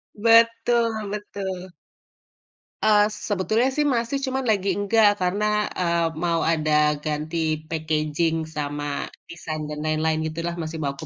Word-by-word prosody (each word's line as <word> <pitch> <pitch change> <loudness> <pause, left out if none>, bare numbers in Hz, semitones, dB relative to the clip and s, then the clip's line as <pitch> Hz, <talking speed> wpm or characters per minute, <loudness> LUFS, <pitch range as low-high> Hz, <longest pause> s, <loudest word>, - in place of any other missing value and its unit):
Betul 230 0 +3
betul. 190 -3 -5 1.1
Eee, 210 -1 +6 0.2
sebetulnya 215 +5 +1
sih 295 - +3
masih 235 +4 -1
cuma 265 0 -1
lagi 200 -2 +1
enggak 205 +1 +4
karena, 195 +4 0 0.3
eee, 170 -1 +1 0.2
mau 170 -1 +1
ada 155 -1 -1 0.3
ganti 155 +2 -3 0.3
packaging 155 0 0 0.2
sama 145 0 -3 0.5
design 155 -2 -5
dan 150 0 -5
lain-lain 155 0 +1
gitu 160 +1 -4
lah, 170 - -2
masih 160 0 -5
mau 140 - 0
aku 160 - -7
180 Hz, 130 wpm, -24 LUFS, 155-215 Hz, 1.1 s, Eee